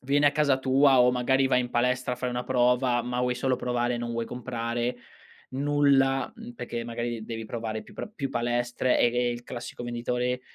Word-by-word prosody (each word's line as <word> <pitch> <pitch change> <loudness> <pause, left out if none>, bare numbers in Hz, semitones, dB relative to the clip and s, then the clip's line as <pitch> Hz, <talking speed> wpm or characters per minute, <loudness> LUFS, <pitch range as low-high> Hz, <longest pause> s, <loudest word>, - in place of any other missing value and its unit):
viene 145 +2 +3
a 145 - +4
casa 145 -3 +2
tua, 135 0 +4
o 125 0 +6
magari 130 +2 +2
vai 125 -1 +3
in 125 0 -4
palestra, 125 +1 0
fai 125 0 -2
una 125 0 -3
prova, 125 -1 +2
ma 125 +1 -2
vuoi 125 0 +1
solo 130 0 0
provare, 120 0 -1
e - - -3
non 120 0 -4
vuoi 115 0 -2
comprare 120 -1 -3 0.5
nulla, 140 +2 +2
mhmm, 235 +1 -10
perché, 120 - -5
magari, 120 -1 -4
devi 115 -1 -5
provare 110 -1 -4
più - - -16
pro - - -6
più 135 -1 -3
palestre, 120 +1 0
ehm, 120 0 +3
e 120 0 +2
il 120 0 -5
classico 120 0 -7
venditore 125 +1 -2
125 Hz, 200 wpm, -27 LUFS, 120-130 Hz, 0.5 s, o